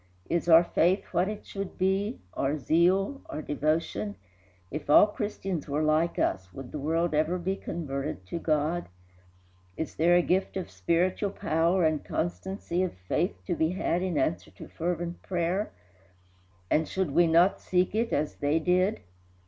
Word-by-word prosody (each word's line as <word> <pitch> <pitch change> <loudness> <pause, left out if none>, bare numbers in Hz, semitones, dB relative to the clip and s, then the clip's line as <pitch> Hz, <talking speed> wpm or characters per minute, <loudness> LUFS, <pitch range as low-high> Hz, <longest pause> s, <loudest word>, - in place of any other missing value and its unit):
Is 170 0 0
our 165 +1 +8
faith 175 +3 +2
what 180 +3 +2
it 210 - -6
should 195 -1 -6
be, 190 - 0
our 140 +3 0
zeal, 185 - +2
our 155 - -5
devotion? 145 -9 -1 0.6
If 150 +1 -6
all 150 - +8
Christians 195 -6 -4
were 145 +2 0
like 155 +2 +2
us, 95 0 -1
would 130 +5 -9
the 150 - -5
world 165 +3 0
ever 155 +4 +1
be 185 +2 -2
converted 140 - -4
to 170 - -4
God? 155 - 0 0.9
Is 160 - -4
there 170 +2 +4
a 175 - +4
gift 190 +2 0
of 185 - -5
spiritual 180 +4 0
power 170 -2 +1
and 155 -2 +1
constancy 180 +1 -3
of 185 - -1
faith 175 - -1
to 180 - -1
be 160 +1 +1
had 180 -2 0
in 185 -4 -1
answer 150 +4 0
to - - -12
fervent 175 +1 -3
prayer? 180 +3 -1 1.0
and 155 +1 +2
should 190 -6 -1
we 175 +4 +4
not 170 +4 +4
seek 180 0 +1
it 230 +2 0
as 150 +1 -1
they 145 +2 +1
did? 180 +5 +1
170 Hz, 165 wpm, -28 LUFS, 155-185 Hz, 1.0 s, our